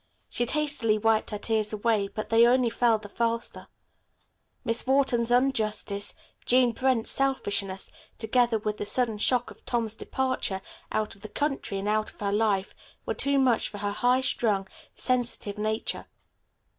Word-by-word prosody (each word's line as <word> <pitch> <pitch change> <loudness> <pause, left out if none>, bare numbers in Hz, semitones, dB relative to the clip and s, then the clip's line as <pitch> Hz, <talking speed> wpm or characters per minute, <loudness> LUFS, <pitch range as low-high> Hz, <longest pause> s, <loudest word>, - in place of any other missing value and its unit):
She 240 - -1
hastily 285 -7 +1
wiped 220 0 +2
her 210 - -3
tears 215 0 -1
away, 215 -1 +1
but 215 +2 -6
they 230 +1 +6
only 245 -1 +3
fell 230 -1 +3
the 210 -1 -10
faster. 230 +2 -2 1.0
Miss 230 +2 +1
Wharton's 260 -4 +2
injustice, 220 -5 +1 0.3
Jean 250 -1 +4
Brent's 255 -1 +2
selfishness, 200 -8 0 0.3
together 235 +1 +2
with 210 0 -3
the - - -4
sudden 230 -4 +1
shock 245 +2 +1
of - - -16
Tom's 230 -3 0
departure 240 -6 -2 0.3
out 215 -1 -1
of 195 - -19
the 215 - -8
country 275 -6 -2
and 195 +1 -3
out 215 0 +1
of - - -19
her 200 -1 -1
life, 205 -2 +1 0.3
were - - -1
too 280 0 +2
much 255 -4 +2
for 205 - -8
her 205 0 -2
high 250 +5 +2
strung, 210 -6 0 0.3
sensitive 240 -5 0
nature. 215 +1 -2
225 Hz, 155 wpm, -27 LUFS, 210-250 Hz, 1.0 s, they